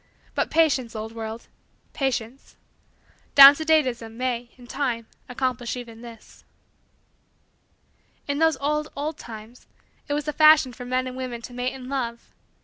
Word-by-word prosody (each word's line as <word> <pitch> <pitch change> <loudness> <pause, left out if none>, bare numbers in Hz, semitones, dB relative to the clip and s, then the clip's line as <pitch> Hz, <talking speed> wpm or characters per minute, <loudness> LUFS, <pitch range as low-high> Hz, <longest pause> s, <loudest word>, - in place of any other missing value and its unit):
But, - - -1
patience, 275 -8 +1
old 220 +1 -5
world 225 0 -7 0.5
patience 260 -2 -3 0.8
down 275 0 +12
to 315 - -5
date 315 -2 +4
ism 230 -3 -6
may, 245 -1 -2
in 245 - -14
time, 240 -3 -2 0.2
accomplish 250 -1 -2
even 230 -2 -9
this. 235 -2 -13 1.8
In 285 0 -1
those 320 -3 +3
old, 300 +2 -1
old, 295 +2 -4
times, 225 +2 -11
too, - - -42 0.4
it 290 - -2
was 295 - -3
the 300 - -3
fashion 305 -5 +6
for 250 +1 -9
men 255 +1 -1
and 255 0 -6
women 250 -2 -6
to 245 - -9
mate 250 +1 -2
in 255 -1 -9
love. 240 -4 -4
255 Hz, 155 wpm, -24 LUFS, 235-285 Hz, 1.8 s, down